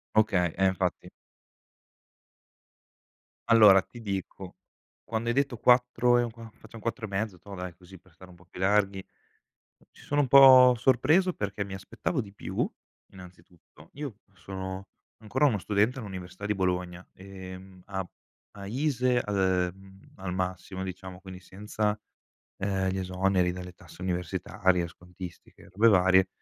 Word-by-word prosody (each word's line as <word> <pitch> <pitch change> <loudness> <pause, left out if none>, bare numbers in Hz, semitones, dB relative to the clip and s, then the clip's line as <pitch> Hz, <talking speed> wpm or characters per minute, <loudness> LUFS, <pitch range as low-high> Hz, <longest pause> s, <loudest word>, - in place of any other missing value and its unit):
Okay, 90 -6 +2
eh, 95 - +3
infatti. 95 -1 -2 2.4
Allora, 105 -4 +8
ti 120 - -14
dico, 95 -3 -6 0.5
quando 115 +1 -3
hai - - +2
detto 135 -3 0
4 125 0 +4
e - - +2
un 120 - -3
qua 115 -1 -12
facciam 110 +1 -14
4 115 +1 -3
e - - -7
mezzo, 100 -2 -3
toh, 100 +2 -10
dai, 90 -1 -6
così, 95 +1 -15
per 90 -1 -25
stare 90 +2 -15
un 90 - -15
po' 85 - -21
più 90 - -13
larghi 100 0 +1 0.9
ci - - -18
sono 145 0 -1
un 140 - +3
po' 130 -2 +9
sorpreso, 145 +10 +3
perché, 100 - -4
mi 100 -1 -8
aspettavo 100 - -4
di 100 -4 -5
più, - - -3 0.4
innanzitutto. 90 -4 -16
Io, 140 -7 -7 0.2
sono 95 +1 -7 0.3
ancora 125 +7 +1
uno 110 -8 +2
studente, 105 +7 +1
all'Università 95 -2 -8
di 105 - +1
Bologna 90 -1 -2
e, 95 -1 -10
mhmm, 95 -1 -15
a 95 -2 -5 0.4
a 100 -1 -9
ISEE 125 +1 +1
al 105 -1 -3 0.4
ehm, 95 0 -18
al 95 -2 -5
massimo, 95 +1 -4
diciamo, 95 0 -8
quindi 95 -1 -10
senza, 105 +2 -3 0.6
ehm, 95 -1 -1
gli 95 +1 -2
esoneri 95 -1 +1
dalle 90 0 -8
tasse 85 0 -16
universitarie, 90 0 -1
scontistiche, 90 +1 -12
e - - -16
robe 105 +5 +3
varie, 95 -1 +5
95 Hz, 150 wpm, -28 LUFS, 90-110 Hz, 2.4 s, po